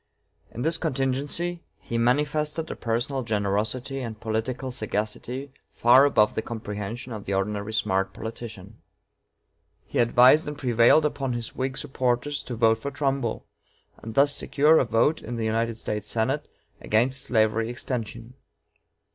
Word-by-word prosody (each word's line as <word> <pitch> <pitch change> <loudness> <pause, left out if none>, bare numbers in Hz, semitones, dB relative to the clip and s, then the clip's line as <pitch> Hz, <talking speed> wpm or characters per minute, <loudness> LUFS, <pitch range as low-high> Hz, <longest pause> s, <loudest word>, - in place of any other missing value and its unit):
In 120 - -6
this 165 +2 +2
contingency, 145 +4 -1 0.2
he 115 - -4
manifested 150 +6 0
a - - -4
personal 120 +4 -1
generosity 110 +4 -1
and 115 -4 -6
political 115 +4 -3
sagacity 120 +4 -3 0.2
far 125 +4 +6
above 105 -7 +3
the - - -1
comprehension 110 +2 -6
of 105 -2 -7
the 100 - -1
ordinary 100 +2 -2
smart 95 -3 0
politician. 110 -2 -8 1.0
He - - -3
advised 125 +6 +5
and 150 -1 -5
prevailed 125 +3 +4
upon 140 -3 -1
his 120 -1 -5
Whig 130 +1 -2
supporters 130 +2 -1
to 125 - -6
vote 110 -1 +3
for 140 - -4
Trumbull, 135 -4 -2 0.5
and 110 0 -8
thus 145 +1 +4
secure 155 +2 +3
a - - +2
vote 115 +8 +2
in 120 - -6
the 115 -1 -2
United 115 +1 0
States 105 -1 -4
Senate 130 +6 -1 0.3
against 125 +5 +1
slavery 110 -1 +1
extension. 120 -1 -5
120 Hz, 140 wpm, -25 LUFS, 110-135 Hz, 1.0 s, far